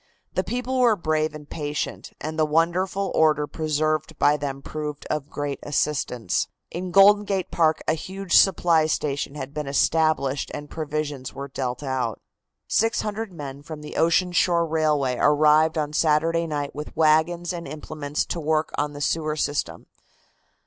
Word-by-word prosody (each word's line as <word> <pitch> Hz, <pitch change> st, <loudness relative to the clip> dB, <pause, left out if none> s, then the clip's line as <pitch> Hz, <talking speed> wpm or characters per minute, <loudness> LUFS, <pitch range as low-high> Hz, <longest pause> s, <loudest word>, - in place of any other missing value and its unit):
The 185 Hz, -, 0 dB
people 250 Hz, +6 st, -2 dB
were 240 Hz, -3 st, +5 dB
brave 155 Hz, -3 st, -1 dB
and 150 Hz, -1 st, -10 dB
patient, 150 Hz, -1 st, -4 dB
and 155 Hz, +1 st, -5 dB
the -, -, +5 dB
wonderful 175 Hz, +5 st, +1 dB
order 155 Hz, -2 st, +3 dB
preserved 155 Hz, 0 st, -1 dB
by 145 Hz, -, +4 dB
them 140 Hz, -2 st, -4 dB
proved 150 Hz, -1 st, -5 dB
of 150 Hz, -1 st, -2 dB
great 145 Hz, -1 st, -4 dB
assistance. 125 Hz, -9 st, -1 dB, 0.2 s
In 180 Hz, +2 st, -4 dB
Golden 200 Hz, +3 st, +6 dB
Gate 195 Hz, -3 st, -2 dB
Park 160 Hz, -2 st, +2 dB
a -, -, +3 dB
huge 190 Hz, +3 st, -3 dB
supply 170 Hz, -4 st, +5 dB
station 145 Hz, -2 st, -2 dB
had 140 Hz, -1 st, -6 dB
been 150 Hz, -2 st, -4 dB
established 145 Hz, -1 st, +1 dB
and 145 Hz, 0 st, -8 dB
provisions 150 Hz, -4 st, -4 dB
were 140 Hz, +1 st, -6 dB
dealt 130 Hz, 0 st, -4 dB
out. 130 Hz, -5 st, -2 dB, 0.5 s
Six 225 Hz, +2 st, +2 dB
hundred 215 Hz, 0 st, -4 dB
men 140 Hz, -4 st, -8 dB
from 150 Hz, 0 st, -8 dB
the 150 Hz, -, -9 dB
Ocean 170 Hz, +2 st, +3 dB
Shore 170 Hz, -1 st, +3 dB
Railway 150 Hz, -5 st, +1 dB
arrived 155 Hz, +2 st, +4 dB
on 150 Hz, -1 st, -1 dB
Saturday 165 Hz, +2 st, +2 dB
night 145 Hz, -2 st, -3 dB
with 150 Hz, +1 st, -8 dB
wagons 165 Hz, +3 st, +3 dB
and 170 Hz, -1 st, -6 dB
implements 150 Hz, 0 st, -4 dB
to 175 Hz, -, -4 dB
work 155 Hz, 0 st, 0 dB
on 145 Hz, 0 st, -1 dB
the 145 Hz, -, -8 dB
sewer 155 Hz, 0 st, 0 dB
system. 145 Hz, -1 st, -2 dB
155 Hz, 160 wpm, -24 LUFS, 145-170 Hz, 0.5 s, Golden